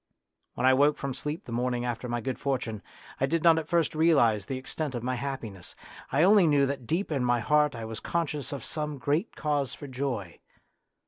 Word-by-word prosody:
When 125 - 0
I 130 - +7
woke 145 +3 +4
from 140 -1 -3
sleep 150 +7 -5
the - - -9
morning 120 +1 -1
after 120 0 -3
my 120 0 -1
good 130 +1 -3
fortune, 125 -6 -2 0.4
I 135 - +2
did 165 +2 0
not 165 -1 +6
at 155 - -6
first 170 -3 +1
realise 145 -10 +3
the 135 - -3
extent 135 +1 -4
of 120 - -4
my 130 +1 -1
happiness; 120 -8 -6 0.4
I 150 - +3
only 195 -1 +6
knew 145 -2 +4
that 135 -3 -4
deep 170 +3 -1
in 135 -4 0
my 120 -1 +2
heart 150 +3 +2
I 115 -1 -5
was 110 0 -6
conscious 155 -4 -2
of 140 - -5
some 150 -2 -3
great 145 - -1
cause 145 -3 -1
for - - -9
joy. 130 -9 -4
135 Hz, 210 wpm, -28 LUFS, 120-150 Hz, 0.4 s, I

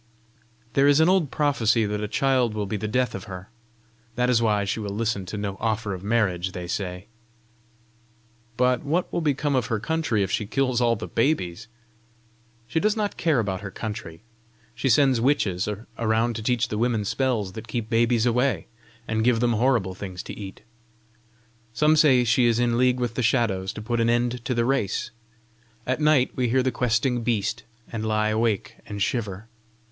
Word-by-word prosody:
"There 140 +1 +4
is 145 +1 +5
an 160 - +5
old 185 -6 +2
prophecy 115 -7 +2
that 105 0 -2
a 105 - -2
child 130 -2 +1
will 105 -1 -2
be 100 - -3
the 105 +1 -3
death 125 +3 0
of 95 - -6
her. 95 0 -9 0.7
That 125 0 +2
is 115 -2 +3
why 105 -3 +2
she 100 - -2
will 100 -2 -4
listen 110 -4 -1
to 105 - -5
no 100 -2 -4
offer 110 -2 -1
of 95 0 -7
marriage, 95 -5 0
they 90 -1 -5
say." 90 0 -4 1.5
"But 125 0 +2
what 165 +5 -1
will 170 - 0
become 145 -2 0
of 125 -4 0
her 115 - -1
country 135 -5 0
if 95 - -3
she 105 - -1
kill 130 +2 0
all 120 -1 +3
the - - -6
babies?" 110 - -1 1.0
"She 120 +7 -1
does 215 +4 +1
not 210 -2 -1
care 160 -5 +1
about 95 -4 -2
her 100 - -6
country. 105 -4 -7 0.5
She 120 +4 -1
sends 130 -1 +4
witches 105 -8 +1 0.3
around 115 +1 +1
to 110 - -4
teach 120 +1 0
the 105 - -2
women 115 -3 0
spells 115 -4 -1
that 110 +4 -9
keep 115 -1 -3
babies 115 0 +2
away, 125 +2 +1 0.4
and 110 0 0
give 120 -1 +3
them 120 0 +2
horrible 115 -5 +1
things 90 -1 -7
to - - -7
eat. 95 -2 -9 1.1
Some 150 +4 +4
say 135 -5 +5
she 120 +1 +3
is 115 -1 +2
in 120 -1 +1
league 125 +1 +2
with 120 -2 -1
the 125 - -2
Shadows 110 -5 +1
to 105 - -7
put 120 +1 -1
an 115 - +2
end 120 0 0
to 125 - -1
the 115 0 +1
race. 125 -4 -1 0.7
At 130 +4 -1
night 150 -4 +4
we 125 -2 0
hear 130 +2 +2
the 130 - +1
questing 120 +1 0
beast, 110 -3 -1 0.3
and 110 -2 -4
lie 110 0 +1
awake 110 -2 -1
and 100 -1 -6
shiver. 105 0 -2
115 Hz, 190 wpm, -24 LUFS, 105-125 Hz, 1.5 s, is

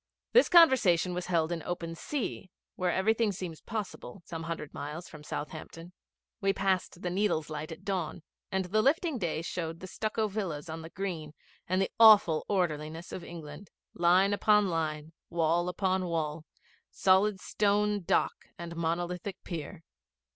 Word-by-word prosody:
This - - +6
conversation 225 - +6
was 180 0 -4
held 165 -2 +1
in 170 -1 -2
open 170 0 -4
sea, 210 - -4 0.3
where 180 -1 0
everything 220 +4 +2
seems 175 -4 -6
possible, 205 -3 -6
some 165 -2 -6
hundred 165 -2 -5
miles 155 +4 -6
from 150 -2 -12
Southampton. 165 +3 -7 0.5
We 195 0 +2
passed 190 -2 -1
the 180 - -1
Needles 180 -5 0
Light 155 +2 -5
at 160 - -10
dawn, 180 -4 -2 0.3
and 190 -1 0
the 215 +4 +2
lifting 300 - +2
day 165 -3 -2
showed 165 -1 -4
the - - -8
stucco 215 +3 -1
villas 180 -7 -4
on 160 +1 -5
the 160 - -9
green 165 -5 -5 0.3
and 185 +1 +1
the 195 - 0
awful 205 -8 +7
orderliness 160 -3 -1
of 180 - -6
England 165 +2 -9 0.2
line 180 +4 +4
upon 210 -1 +4
line, 155 -1 -2 0.2
wall 170 +1 +1
upon 185 0 0
wall, 160 -2 -2 0.4
solid 190 +1 +3
stone 205 +1 +1
dock 175 - 0
and 170 0 -7
monolithic 175 +3 -3
pier. 165 0 -6
175 Hz, 155 wpm, -30 LUFS, 165-195 Hz, 0.5 s, awful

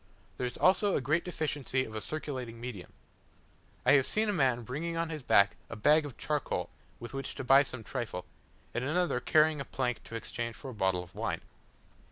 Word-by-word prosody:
There 125 - -1
is 125 - -7
also 195 +2 +4
a - - +2
great 155 +5 +1
deficiency 145 -6 -1
of 110 - -9
a 110 - -3
circulating 130 -6 -4
medium. 115 -7 -7 0.9
I - - +6
have 135 -2 +5
seen 215 0 +1
a - - +2
man 130 -8 +2
bringing 165 +8 -3
on 165 0 -1
his 155 -2 -4
back 100 -5 +4
a - - -5
bag 150 +7 +4
of 130 - -11
charcoal, 150 -2 -2 0.3
with 120 - -8
which 135 -1 -4
to - - -4
buy 135 +2 +7
some 130 -4 -5
trifle, 95 -5 -4 0.5
and 120 - -1
another 160 -1 +1
carrying 155 +3 +3
a - - -2
plank 125 -2 -2
to 115 - -8
exchange 115 0 -4
for 135 - -8
a - - -9
bottle 95 -4 +1
of 90 0 -16
wine. 110 +4 -2
130 Hz, 205 wpm, -31 LUFS, 115-155 Hz, 0.9 s, buy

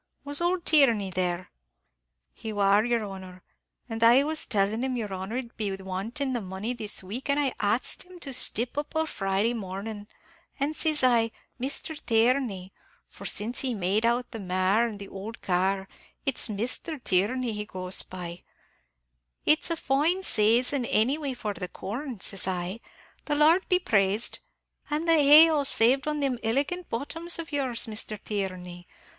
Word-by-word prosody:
Was 285 +2 -6
ould 350 0 0
Tierney 235 -11 +4
there?" 180 0 -2 0.8
"He 220 - -7
war, 205 0 +3
yer 235 -1 0
honor; 190 -2 -9 0.4
and 225 -1 -3
I 240 +4 +7
was 310 +1 0
tellin' 210 +3 0
him 260 -1 -1
yer 210 -4 -4
honor 190 +5 -4
'id 240 -2 -6
be 210 -3 -1
wantin' 200 +9 -4
the 240 - -2
money 190 +5 -4
this 215 -5 -4
week, 230 +10 -6
an' 280 - +2
I 280 -3 +1
axed 215 +4 0
him 360 -1 -12
to 275 -4 -4
stip 245 +2 +1
up 295 +2 -7
o' 320 0 +1
Friday 195 -3 -1
mornin'; 205 0 -6 0.5
an', 285 +3 0
sis 310 -2 +2
I, 235 -3 +4 0.3
'Misthur 280 +4 -1
Tierney' 225 -5 +1 0.4
for - - -9
since 225 +4 0
he 255 -3 -1
made 200 +3 0
out 240 +2 0
the 225 - -6
mare 190 +4 +1
and 215 -3 -7
the 200 -1 -9
ould 205 +4 -8
car, 190 +1 0 0.4
it's 275 - +2
Misthur 245 +9 -1
Tierney 225 +6 +1
he 210 0 -4
goes 185 -2 +1
by 175 -1 -8 1.0
'it's 310 +3 +3
a 335 - 0
fine 315 +7 +1
saison 240 - +4
any 245 +7 +1
way 280 -4 -3
for 210 -4 -4
the 180 -1 -5
corn,' 235 +6 -6
sis 195 -1 0
I, 185 +3 -3 0.5
'the 295 - -1
Lord 320 +5 +4
be 365 - +4
praised; 205 - +1 0.5
an' 300 +2 -1
the 330 - +4
hay 305 +1 +8
all 300 -3 +1
saved 265 +2 +4
on 300 -1 -1
thim 265 -4 -1
illigant 285 +10 -1
bottoms 330 +8 -1
of 330 -1 -7
yours, 265 -5 -1
Misthur 215 -1 -4
Tierney. 185 -4 -5
230 Hz, 170 wpm, -27 LUFS, 195-280 Hz, 1.0 s, hay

